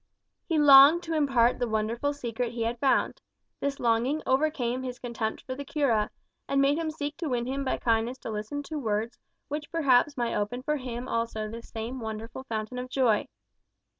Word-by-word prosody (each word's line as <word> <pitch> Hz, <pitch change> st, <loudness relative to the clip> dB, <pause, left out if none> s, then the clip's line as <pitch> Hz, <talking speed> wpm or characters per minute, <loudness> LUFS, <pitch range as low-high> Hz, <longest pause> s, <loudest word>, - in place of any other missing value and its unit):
He 330 Hz, -, +1 dB
longed 290 Hz, +3 st, +8 dB
to 330 Hz, -, -4 dB
impart 265 Hz, -6 st, +3 dB
the 245 Hz, -, 0 dB
wonderful 225 Hz, +6 st, 0 dB
secret 245 Hz, -4 st, -3 dB
he 235 Hz, -1 st, -2 dB
had 230 Hz, +1 st, -2 dB
found. 280 Hz, -, +1 dB, 0.4 s
This 280 Hz, 0 st, -2 dB
longing 240 Hz, +6 st, +1 dB
overcame 260 Hz, -3 st, +1 dB
his 250 Hz, -1 st, -5 dB
contempt 235 Hz, -3 st, -4 dB
for 260 Hz, -, -5 dB
the 280 Hz, +2 st, -6 dB
cura, 265 Hz, -8 st, +1 dB, 0.4 s
and 275 Hz, -, +1 dB
made 280 Hz, +3 st, +3 dB
him 325 Hz, -1 st, -1 dB
seek 295 Hz, -1 st, -4 dB
to 330 Hz, -3 st, -3 dB
win 240 Hz, -2 st, -1 dB
him 270 Hz, +2 st, -2 dB
by 265 Hz, -, -1 dB
kindness 230 Hz, +2 st, 0 dB
to -, -, -5 dB
listen 215 Hz, +7 st, -4 dB
to 305 Hz, +1 st, -5 dB
words 220 Hz, -1 st, -2 dB, 0.3 s
which 300 Hz, +1 st, -5 dB
perhaps 285 Hz, -3 st, +3 dB
might 240 Hz, -1 st, -1 dB
open 225 Hz, +5 st, -2 dB
for 300 Hz, +2 st, 0 dB
him 250 Hz, -2 st, -5 dB
also 230 Hz, -2 st, -2 dB
the 230 Hz, +2 st, -7 dB
same 230 Hz, +3 st, -6 dB
wonderful 225 Hz, +3 st, -6 dB
fountain 225 Hz, +1 st, -4 dB
of 250 Hz, 0 st, -6 dB
joy. 250 Hz, -5 st, +2 dB
250 Hz, 190 wpm, -28 LUFS, 230-285 Hz, 0.4 s, longed